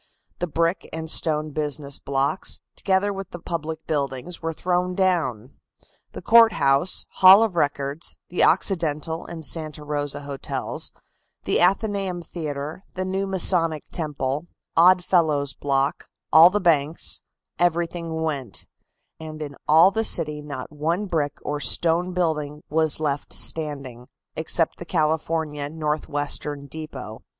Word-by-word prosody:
The 175 Hz, -, -1 dB
brick 165 Hz, +3 st, -1 dB
and 160 Hz, 0 st, -5 dB
stone 155 Hz, -1 st, +1 dB
business 145 Hz, -1 st, -2 dB
blocks, 140 Hz, +6 st, -1 dB, 0.2 s
together 195 Hz, +1 st, +1 dB
with 195 Hz, -1 st, -7 dB
the -, -, -8 dB
public 160 Hz, -2 st, -5 dB
buildings, 140 Hz, +2 st, -3 dB
were 165 Hz, 0 st, -2 dB
thrown 180 Hz, +2 st, -1 dB
down. 155 Hz, -, 0 dB, 0.6 s
The -, -, -8 dB
Court 230 Hz, -1 st, +7 dB
House, 140 Hz, +6 st, +2 dB
Hall 190 Hz, +3 st, +9 dB
of 215 Hz, -6 st, -1 dB
Records, 145 Hz, -1 st, -1 dB
the 180 Hz, -, +2 dB
Occidental 165 Hz, -3 st, +1 dB
and 165 Hz, -2 st, -6 dB
Santa 155 Hz, -2 st, -2 dB
Rosa 145 Hz, -1 st, -3 dB
Hotels, 140 Hz, -1 st, -3 dB, 0.5 s
the -, -, +1 dB
Athenaeum 195 Hz, -1 st, +1 dB
Theatre, 150 Hz, -1 st, -6 dB
the 185 Hz, 0 st, -2 dB
new 190 Hz, +1 st, -2 dB
Masonic 170 Hz, -4 st, +2 dB
Temple, 150 Hz, -1 st, -3 dB, 0.3 s
Odd 180 Hz, +2 st, +5 dB
Fellows' 155 Hz, -6 st, +2 dB
Block, 140 Hz, -1 st, -1 dB, 0.3 s
all 160 Hz, +3 st, +9 dB
the 205 Hz, +3 st, 0 dB
banks, 160 Hz, -4 st, +1 dB, 0.4 s
everything 170 Hz, -1 st, -1 dB
went, 140 Hz, -9 st, -4 dB, 0.5 s
and 155 Hz, -1 st, -8 dB
in 145 Hz, -2 st, -6 dB
all 160 Hz, +5 st, +6 dB
the 225 Hz, +2 st, 0 dB
city 150 Hz, -7 st, +1 dB
not 145 Hz, -2 st, -7 dB
one 165 Hz, +7 st, -1 dB
brick 160 Hz, -6 st, -2 dB
or 150 Hz, 0 st, -3 dB
stone 170 Hz, +4 st, +2 dB
building 150 Hz, -4 st, -2 dB
was 155 Hz, -1 st, +2 dB
left 145 Hz, -2 st, -2 dB
standing, 140 Hz, -6 st, -1 dB, 0.3 s
except 160 Hz, +1 st, 0 dB
the -, -, -5 dB
California 155 Hz, -3 st, -1 dB
Northwestern 150 Hz, -2 st, -1 dB
Depot. 140 Hz, -7 st, -8 dB
160 Hz, 130 wpm, -23 LUFS, 145-175 Hz, 0.6 s, Hall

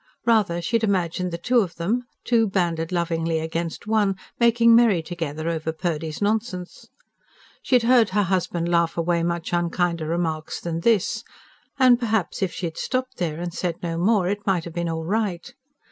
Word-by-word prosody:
Rather 205 Hz, -7 st, +2 dB
she 230 Hz, +7 st, +2 dB
had 225 Hz, -, -6 dB
imagined 180 Hz, -3 st, 0 dB
the 170 Hz, -, -3 dB
two 245 Hz, +8 st, +2 dB
of 180 Hz, -6 st, -1 dB
them 220 Hz, +9 st, -1 dB, 0.2 s
two 230 Hz, -2 st, +3 dB
banded 170 Hz, -4 st, -1 dB
lovingly 165 Hz, -2 st, 0 dB
against 165 Hz, +2 st, -4 dB
one 210 Hz, -3 st, +2 dB, 0.2 s
making 235 Hz, 0 st, +5 dB
merry 220 Hz, -8 st, +4 dB
together 160 Hz, -2 st, -4 dB
over 160 Hz, -1 st, -1 dB
Purdy's 160 Hz, 0 st, -3 dB
nonsense. 205 Hz, -4 st, -2 dB, 0.7 s
She 255 Hz, -, +1 dB
had 245 Hz, -, +4 dB
heard 235 Hz, -2 st, +5 dB
her 205 Hz, +2 st, +1 dB
husband 175 Hz, -2 st, -1 dB
laugh 170 Hz, -1 st, +1 dB
away 170 Hz, 0 st, +1 dB
much 170 Hz, 0 st, -2 dB
unkinder 170 Hz, -1 st, 0 dB
remarks 160 Hz, -2 st, -2 dB
than 165 Hz, -1 st, -3 dB
this. 225 Hz, +3 st, +1 dB, 0.5 s
And 255 Hz, -3 st, +5 dB
perhaps 220 Hz, -7 st, -1 dB
if 190 Hz, -3 st, 0 dB
she 180 Hz, -, -5 dB
had 165 Hz, -1 st, -5 dB
stopped 255 Hz, 0 st, -2 dB
there, 165 Hz, -3 st, -2 dB
and 175 Hz, -1 st, -4 dB
said 175 Hz, -2 st, -2 dB
no 165 Hz, -1 st, -2 dB
more, 195 Hz, 0 st, +3 dB
it 205 Hz, +2 st, -3 dB
might 185 Hz, -4 st, +2 dB
have 170 Hz, -, -8 dB
been 170 Hz, 0 st, -2 dB
all 160 Hz, 0 st, -3 dB
right. 205 Hz, +2 st, -2 dB
175 Hz, 180 wpm, -23 LUFS, 165-215 Hz, 0.7 s, making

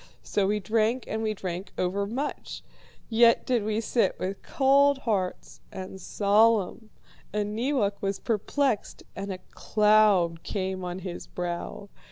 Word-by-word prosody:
So 200 Hz, -2 st, 0 dB
we 210 Hz, +1 st, +1 dB
drank, 220 Hz, +5 st, +1 dB
and 220 Hz, -, -3 dB
we 215 Hz, -1 st, -1 dB
drank 185 Hz, 0 st, -5 dB
overmuch; 200 Hz, +10 st, -3 dB, 0.4 s
yet 230 Hz, 0 st, +4 dB
did 245 Hz, -4 st, +1 dB
we 215 Hz, +1 st, 0 dB
sit 225 Hz, -3 st, +1 dB
with 195 Hz, +1 st, -4 dB
cold 280 Hz, +1 st, +4 dB
hearts 180 Hz, -, -3 dB
and 190 Hz, 0 st, -8 dB
solemn. 215 Hz, +1 st, +2 dB, 0.4 s
And 210 Hz, 0 st, -2 dB
Neewak 225 Hz, -5 st, 0 dB
was 195 Hz, 0 st, -1 dB
perplexed 230 Hz, +2 st, -1 dB
and 195 Hz, 0 st, -4 dB
a 185 Hz, -, -4 dB
cloud 210 Hz, -6 st, +3 dB
came 190 Hz, -2 st, -3 dB
on 180 Hz, 0 st, -4 dB
his 175 Hz, -2 st, -6 dB
brow. 175 Hz, +3 st, -5 dB
210 Hz, 135 wpm, -27 LUFS, 190-225 Hz, 0.4 s, yet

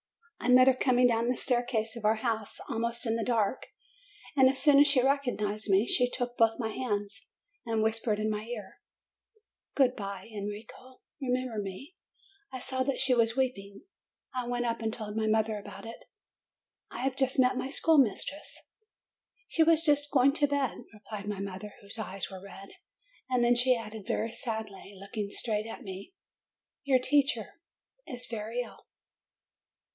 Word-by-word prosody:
I -, -, -4 dB
met 255 Hz, 0 st, +8 dB
her 265 Hz, -, +6 dB
coming 250 Hz, -1 st, +3 dB
down 230 Hz, -1 st, +2 dB
the 250 Hz, 0 st, 0 dB
staircase 240 Hz, -3 st, 0 dB
of 235 Hz, -, -8 dB
our 215 Hz, +1 st, +4 dB
house, 220 Hz, -2 st, -2 dB
almost 235 Hz, +1 st, -1 dB
in 225 Hz, -1 st, +1 dB
the 230 Hz, -, -1 dB
dark, 225 Hz, -1 st, 0 dB, 0.7 s
and, 265 Hz, -2 st, +6 dB
as 265 Hz, -, 0 dB
soon 290 Hz, -2 st, +6 dB
as 290 Hz, -, +7 dB
she 275 Hz, -2 st, +4 dB
recognized 245 Hz, -7 st, 0 dB
me, 195 Hz, +3 st, +4 dB
she 250 Hz, 0 st, +2 dB
took 245 Hz, -1 st, -3 dB
both 225 Hz, -1 st, +3 dB
my 225 Hz, -3 st, -2 dB
hands, 210 Hz, -4 st, -4 dB, 0.4 s
and 225 Hz, -1 st, +1 dB
whispered 220 Hz, -1 st, 0 dB
in 215 Hz, -, 0 dB
my 210 Hz, 0 st, -2 dB
ear, 220 Hz, -5 st, -8 dB, 1.0 s
"Good 260 Hz, -3 st, +3 dB
bye, 200 Hz, -1 st, -6 dB
Enrico; 210 Hz, +5 st, -8 dB, 0.2 s
remember 250 Hz, -3 st, -1 dB
me!" 200 Hz, -, -8 dB, 0.6 s
I 260 Hz, -, -5 dB
saw 260 Hz, +1 st, -3 dB
that 265 Hz, +1 st, 0 dB
she 265 Hz, -1 st, +4 dB
was 230 Hz, -1 st, +2 dB
weeping. 200 Hz, -7 st, -2 dB, 0.5 s
I 250 Hz, -1 st, -3 dB
went 245 Hz, 0 st, -1 dB
up 230 Hz, -1 st, -1 dB
and 220 Hz, -1 st, -1 dB
told 215 Hz, -2 st, -6 dB
my 220 Hz, -1 st, 0 dB
mother 220 Hz, 0 st, +1 dB
about 205 Hz, -, -10 dB
it. 230 Hz, -, -10 dB, 0.8 s
"I 240 Hz, -, -6 dB
have 265 Hz, -1 st, 0 dB
just 265 Hz, -1 st, +1 dB
met 255 Hz, 0 st, +4 dB
my 260 Hz, -, -2 dB
schoolmistress/' 285 Hz, -, +2 dB, 0.9 s
"She 330 Hz, -, 0 dB
was 325 Hz, 0 st, +5 dB
just 290 Hz, -2 st, +2 dB
going 275 Hz, 0 st, +5 dB
to 290 Hz, -1 st, +2 dB
bed," 280 Hz, -3 st, -1 dB
replied 210 Hz, -1 st, -8 dB
my 205 Hz, -2 st, -3 dB
mother, 200 Hz, +1 st, -6 dB
whose 200 Hz, +3 st, -6 dB
eyes 195 Hz, -2 st, -4 dB
were 190 Hz, -1 st, -8 dB
red. 195 Hz, 0 st, -11 dB, 0.6 s
And 250 Hz, -1 st, +2 dB
then 240 Hz, 0 st, +5 dB
she 250 Hz, +1 st, +4 dB
added 215 Hz, -2 st, -8 dB
very 225 Hz, -, -1 dB
sadly, 220 Hz, -4 st, -5 dB
looking 200 Hz, +1 st, -5 dB
straight 215 Hz, +1 st, -1 dB
at 225 Hz, -, -8 dB
me, 195 Hz, -, -9 dB, 0.7 s
"Your 275 Hz, -3 st, +4 dB
poor 250 Hz, -, -6 dB
teacher 280 Hz, -, +1 dB, 0.5 s
is 250 Hz, -4 st, -3 dB
very 225 Hz, +2 st, -3 dB
ill." 245 Hz, -, -11 dB
235 Hz, 170 wpm, -30 LUFS, 215-255 Hz, 1.0 s, met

